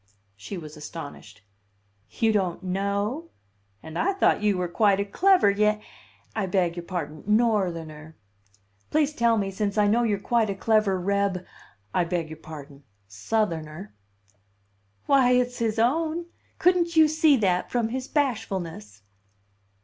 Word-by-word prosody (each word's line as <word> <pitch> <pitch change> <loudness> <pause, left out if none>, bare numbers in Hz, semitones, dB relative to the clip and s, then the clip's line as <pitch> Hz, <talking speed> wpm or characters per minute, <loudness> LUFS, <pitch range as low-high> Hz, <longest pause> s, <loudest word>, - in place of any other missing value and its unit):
She 105 - -7
was 155 -2 -9
astonished. 145 -9 -9 0.7
"You 225 -1 +1
don't 185 -4 -1
know? 200 - -2 0.5
And 160 +1 -6
I 390 +3 +2
thought 385 - +2
you 205 -2 +2
were 180 -1 -1
quite 200 +2 +2
a 200 - 0
clever 360 - +4
Ya 210 +1 +2 0.6
I 210 -3 -1
beg 180 -2 +1
your 175 -1 -6
pardon 155 -5 -5
Northerner. 170 -9 0 0.7
"Please 300 -1 +1
tell 235 -3 +2
me, 195 -2 -1
since 200 +1 -2
I 210 - +4
know 220 +4 +3
you're 215 -4 +1
quite 225 +1 +1
a 195 - -2
clever 210 -2 +2
Reb 200 -1 0 0.5
I 180 - +2
beg 170 -2 -3
your 160 - -9
pardon 145 -3 -11 0.3
Southerner." 165 - -3 1.1
"Why, 260 -3 +4
it's 250 0 +1
his 225 -1 0
own! 315 +8 +1 0.3
Couldn't 345 -1 +2
you 315 -1 +7
see 310 -2 +4
that 185 -5 +1
from 235 -2 0
his 255 +2 -4
bashfulness?" 190 - -3
200 Hz, 140 wpm, -25 LUFS, 170-235 Hz, 1.1 s, you